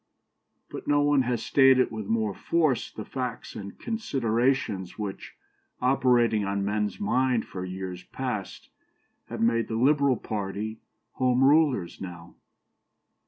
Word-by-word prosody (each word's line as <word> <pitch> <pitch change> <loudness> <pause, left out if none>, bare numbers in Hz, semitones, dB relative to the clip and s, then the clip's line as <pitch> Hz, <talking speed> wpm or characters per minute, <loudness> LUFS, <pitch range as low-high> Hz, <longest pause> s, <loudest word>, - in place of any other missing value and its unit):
But - - -8
no 145 0 +3
one 145 -1 +4
has 120 -3 -1
stated 135 -2 +5
with 110 -3 -5
more 110 -2 0
force 155 - 0
the 110 - -8
facts 125 -3 -5
and 100 -1 -8
considerations 125 - -1
which, 105 -3 -6 0.4
operating 125 -4 +3
on 100 0 -1
men's 105 0 -1
mind 130 - +1
for 90 - -6
years 95 -1 -6
past, 125 -7 -5 0.6
have - - -6
made 115 0 +2
the 110 - -3
Liberal 140 +1 +3
party 105 +1 -4 0.4
Home 130 0 +3
Rulers 140 - +3
now. 85 -2 -8
115 Hz, 125 wpm, -27 LUFS, 100-135 Hz, 0.6 s, stated